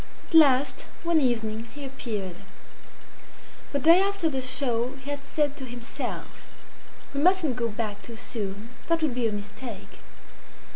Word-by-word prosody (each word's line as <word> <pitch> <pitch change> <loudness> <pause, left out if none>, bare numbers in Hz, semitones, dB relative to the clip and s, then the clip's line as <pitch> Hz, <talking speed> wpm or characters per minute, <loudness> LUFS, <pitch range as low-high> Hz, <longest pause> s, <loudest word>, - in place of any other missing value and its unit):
At - - -14
last 275 -4 +5 0.2
one 335 -2 +3
evening 225 -3 0
he 290 -1 -6
appeared. 210 -9 -4 1.3
The 285 - +1
day 330 +6 +7
after 395 -4 +1
the 265 -1 -1
show 255 -1 0
he 275 +1 -7
had 285 -1 -4
said 290 0 0
to 265 - -5
himself 240 -1 -6 0.6
"We 280 - 0
mustn't 345 -6 +4
go 235 -2 0
back 215 -1 -4
too 235 - -8
soon; 210 -1 -4 0.2
that 330 -1 +2
would 300 -5 +2
be 240 -2 +1
a - - -1
mistake." 210 +1 -7
255 Hz, 150 wpm, -27 LUFS, 230-290 Hz, 1.3 s, day